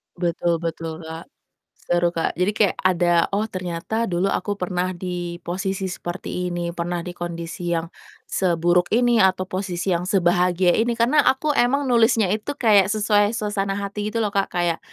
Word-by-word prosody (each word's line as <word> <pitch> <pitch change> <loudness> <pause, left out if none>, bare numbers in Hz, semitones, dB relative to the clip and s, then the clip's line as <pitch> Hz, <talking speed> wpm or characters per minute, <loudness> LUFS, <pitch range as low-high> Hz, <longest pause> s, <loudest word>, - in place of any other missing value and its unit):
Betul 170 -1 0
betul, 165 0 -4
Kak. 160 +1 -8 0.6
Seru, 175 0 +2
Kak, 165 -1 -2
jadi 180 +4 +1
kayak 205 -3 +2
ada, 175 -2 +3 0.2
"Oh 215 +2 0
ternyata 185 +4 -3
dulu 175 +3 +1
aku 205 +2 -1
pernah 180 0 -1
di 175 -1 -5
posisi 190 +2 -3
seperti 180 0 -4
ini 175 0 -2
pernah 175 0 -2
di 180 - -6
kondisi 170 0 -5
yang 165 0 -2 0.4
seburuk 175 -1 +2
ini 240 0 +3
atau 185 0 +3
posisi 185 -1 -2
yang 170 - -2
sebahagia 180 -1 +3
ini," 235 +2 +1
karena 275 +6 +4
aku 280 +4 +2
emang 275 +3 +2
nulisnya 230 -3 +4
itu 215 +7 -2
kayak 205 -4 +4
sesuai 210 -1 +2
suasana 205 -2 -2
hati 200 +1 -4
gitu 230 - -1
loh, 210 - -1
Kak. 195 0 +1
Kayak 175 -2 0
185 Hz, 165 wpm, -22 LUFS, 175-210 Hz, 0.6 s, karena